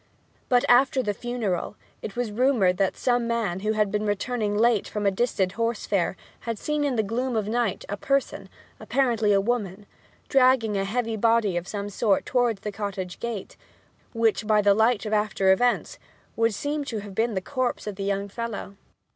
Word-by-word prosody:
But, 245 -1 +4
after 260 +1 +4
the 205 -2 -1
funeral, 220 -5 -3 0.3
it 210 - -7
was 240 -3 -2
rumoured 215 -6 +2
that 195 0 0
some 245 -2 +1
man 225 -6 -1
who 215 +2 0
had 210 -2 +1
been 210 0 -1
returning 205 0 -1
late 230 -2 +3
from 210 -1 -3
a 200 - +4
distant 190 -3 0
horse 230 +2 -2
fair 190 -2 0 0.2
had 230 -2 -4
seen 300 +6 -1
in 280 -3 0
the 220 - +2
gloom 245 +4 -2
of 215 -2 0
night 230 -3 -1
a 205 - -4
person, 275 +4 -1 0.3
apparently 235 -6 +1
a 200 - +4
woman, 205 -3 -2 0.4
dragging 255 -5 +3
a 195 0 0
heavy 225 +1 -2
body 225 -3 +2
of 175 +1 -3
some 205 -1 -4
sort 205 0 +1
towards 240 -5 +1
the 210 - -4
cottage 200 -3 -5
gate, 235 -5 -5 0.6
which, 225 -2 +1
by 215 -1 +4
the 205 -1 +5
light 220 0 +2
of 215 - -2
after 210 -2 +2
events, 240 +6 +1 0.4
would 230 -2 +1
seem 290 +5 -2
to 225 -6 -4
have 200 -1 -9
been 225 +2 0
the - - +1
corpse 255 +5 -2
of 210 -2 -5
the 195 - -5
young 200 0 -1
fellow. 205 -2 -6
215 Hz, 190 wpm, -25 LUFS, 200-240 Hz, 0.6 s, the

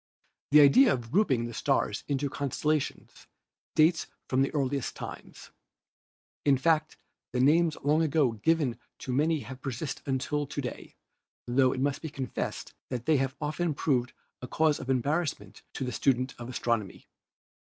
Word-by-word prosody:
The 150 +1 +8
idea 215 - +7
of 120 -5 -3
grouping 140 - +2
the 120 - -6
stars - - 0
into 140 0 0
constellations 145 +2 -2 0.5
dates 160 +1 +3 0.2
from 130 0 +1
the 135 - +2
earliest 140 -3 -1
times. - - -9 0.9
In 140 -2 +4
fact 155 +2 +1 0.4
the 125 - 0
names 155 +4 +4
long 150 +3 +3
ago 150 -5 +2
given 140 +2 0 0.2
to 130 - -5
many 155 +3 +2
have 130 -1 -9
persisted 135 +2 -5
until 140 +2 -1
to 145 - -5
day, 125 -3 -6 0.5
tho 130 +1 +3
it 130 - -3
must 140 0 0
be 160 - -5
confessed 135 -3 -5 0.2
that 125 -2 -4
they 155 -2 +4
have 135 0 -1
often 155 +1 -1
proved 130 -4 0 0.3
a 125 - -6
cause 155 +2 +2
of 130 - -7
embarrassment 135 - -1
to - - -4
the 125 - -2
student 130 +1 +1
of 120 0 -7
astronomy. 115 -5 -2
140 Hz, 155 wpm, -29 LUFS, 125-155 Hz, 0.9 s, The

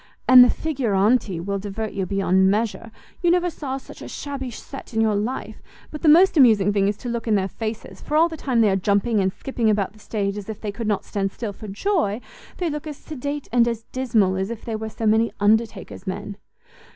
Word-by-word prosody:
And 255 -1 +10
the 245 - +5
figuranti 225 - +1
will 200 +3 -3
divert 205 +2 -5
you 195 -2 -2
beyond 190 -1 +2
measure; 220 +2 -1 0.3
you 350 - +3
never 355 0 +2
saw 270 -4 -4
such 270 - -12
a - - -7
shabby 275 -3 -5
set 245 +1 -10
in - - +1
your 220 -1 +3
life: 215 +6 -3 0.3
but 300 - -7
the 315 - +4
most 355 +5 +6
amusing 215 - +5
thing 200 -1 +2
is 205 0 -1
to 250 - -8
look 235 -1 -3
in 215 - +3
their 190 -1 +1
faces, 220 +3 -6
for 300 - -1
all 330 +2 +5
the 330 - -7
time 255 -6 0
they 215 - +4
are - - +2
jumping 205 +3 +1
and 190 -1 +1
skipping 235 0 -1
about 205 -2 0
the 215 - -19
stage 200 -2 -3
as 200 - -10
if 220 - -6
they 210 - -4
could 225 +2 -5
not 210 -2 0
stand 195 -1 -2
still 215 -1 -5
for 215 - -10
joy, 215 - 0 0.4
they 355 - -1
look 300 0 -4
as 295 -2 -6
sedate 290 -1 -5
and 235 0 +4
as 230 -1 -3
dismal 220 -8 +1
as 190 +2 -2
if 235 -2 -7
they 225 - -3
were 220 0 -4
so 220 +1 -5
many 220 +2 +3
undertaker's 220 0 0
men." 195 +2 -4
220 Hz, 230 wpm, -23 LUFS, 200-260 Hz, 0.4 s, And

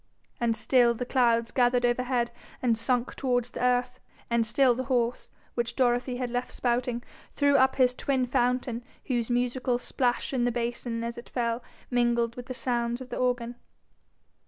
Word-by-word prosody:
And 230 -2 +1
still 235 +2 +4
the 250 - -3
clouds 235 -3 +2
gathered 245 -1 +3
overhead 245 0 +1 0.3
and 240 -3 +2
sunk 240 +2 0
towards 245 -2 0
the - - -4
earth; 250 0 +1 0.3
and 235 -1 +2
still 255 +2 +4
the 260 +2 -3
horse, 245 -2 0 0.2
which 235 0 -2
Dorothy 245 0 +1
had 250 -1 -3
left 245 +1 -2
spouting, 245 0 -1 0.3
threw 285 -1 +3
up 265 0 +4
his 250 -2 +4
twin 260 0 0
fountain, 245 -1 0 0.2
whose 240 -3 -1
musical 245 0 0
plash 245 +1 -1
in 250 -2 +1
the 245 - +2
basin 235 0 -3
as 235 0 -4
it 235 - -13
fell 235 -1 -1 0.3
mingled 240 -1 +2
with 245 0 -8
the 255 - -5
sounds 240 -1 -1
of 255 -1 -9
the - - -4
organ. 245 -1 0
245 Hz, 170 wpm, -28 LUFS, 235-250 Hz, 0.3 s, still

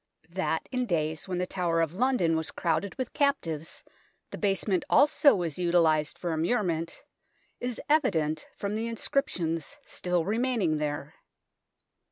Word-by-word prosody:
That 175 -3 -1
in 250 -1 -1
days 160 -3 -1
when 185 -1 -2
the 180 - 0
Tower 175 -3 0
of 165 -1 +1
London 210 -7 +2
was 160 0 -1
crowded 180 +3 -1
with 255 -2 -4
captives 170 - -1 0.5
the - - -6
basement 195 -2 +1
also 290 0 +5
was 170 -4 -2
utilized 165 -3 +2
for 175 - -3
immurement 165 -1 -1 0.6
is 245 -1 -3
evident 165 - +1
from 200 0 -3
the 225 +2 -2
inscriptions 175 - -1
still 180 -2 -1
remain 240 +4 0
ing 155 -1 +2
there. 150 -1 -3
180 Hz, 140 wpm, -28 LUFS, 160-225 Hz, 0.6 s, also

